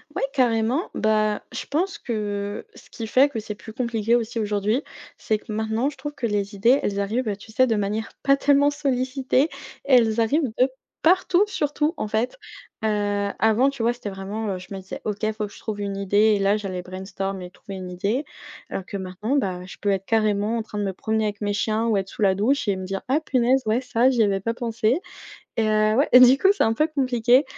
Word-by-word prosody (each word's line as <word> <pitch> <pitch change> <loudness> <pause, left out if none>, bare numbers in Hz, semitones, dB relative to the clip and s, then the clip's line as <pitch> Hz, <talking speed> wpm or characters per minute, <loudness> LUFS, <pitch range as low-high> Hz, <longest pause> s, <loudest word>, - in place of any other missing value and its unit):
Oui, - - -2
carrément, 245 - +1
bah, 215 -1 +1
je - - -5
pense 360 +7 -1
que 205 -3 -4
ce - - -16
qui 225 -1 -6
fait 270 +5 +4
que 230 - -4
c'est 210 -1 -6
plus 220 +1 -11
compliqué 235 -2 0
aussi 230 0 -2
aujourd'hui, 210 +5 0 0.3
c'est 215 - 0
que 220 - -10
maintenant 220 +5 0
je 285 - -12
trouve 295 0 -6
que 235 - -2
les 205 -1 -2
idées 240 +8 +4
elles 200 0 -1
arrivent, 220 +4 -1
heu, 205 - -1
tu 210 +2 -14
sais, 255 +3 +3
de 225 - +1
manière 210 +2 -2
pas 275 0 +4
tellement 285 +1 +4
sollicitée, 270 0 0 0.4
elles 235 -4 +4
arrivent 265 +2 +1
de 255 +1 +5 0.3
partout, 370 +3 +4
surtout, 300 -3 -1
en - - -2
fait, 225 - -1 0.5
heu, - - +3 0.5
avant, 220 +6 +4
tu 275 -4 -6
vois, 235 - +3
c'était 240 -4 -6
vraiment, 200 +3 -5
heu, - - -4
je 180 - -11
me 195 - -5
disais: 190 - -8
«OK, 215 +1 -1
faut 215 -1 -3
que - - -16
je - - -13
trouve 210 -2 -5
une 200 -1 -3
idée!» 200 +1 -1 0.2
et - - -4
là 200 +1 +3
j'allais 190 -4 -4
brainstorm 190 +1 -5
et 180 - -7
trouver 195 +1 -10
une 185 -1 -7
idée 205 +10 -1 0.5
alors 190 - -4
que, - - -8
maintenant, 195 +7 -3
bah, 185 -8 -1
je 190 - -10
peux 205 - 0
être, 195 0 -1
carrément, 215 0 +1
en - - -1
train 210 - -8
de 205 - -1
me 190 - -2
promener 220 +3 -1
avec 205 0 -4
mes 205 0 0
chiens 220 +2 0
ou 215 -3 +2
être 190 -1 -2
sous - - -10
la 190 -2 +4
douche 230 +2 +1
et 190 - +1
me 185 - -5
dire: 195 +1 -4
«Ah, 290 +4 +3
punaise, 260 -3 +2
ouais, 225 +4 +1
ça, 250 0 +2
j'y 240 -4 +3
avais 195 -1 +1
pas 230 +4 -2
pensé!» 230 - 0 0.6
et 225 - +2
heu, 215 0 +3
ouais 280 +4 +3
et 250 - +10
du 255 +2 +8
coup, 390 +6 +4
c'est - - +1
un 225 - +3
peu 305 +7 +2
compliqué, 255 -3 +3
220 Hz, 235 wpm, -23 LUFS, 205-255 Hz, 0.6 s, et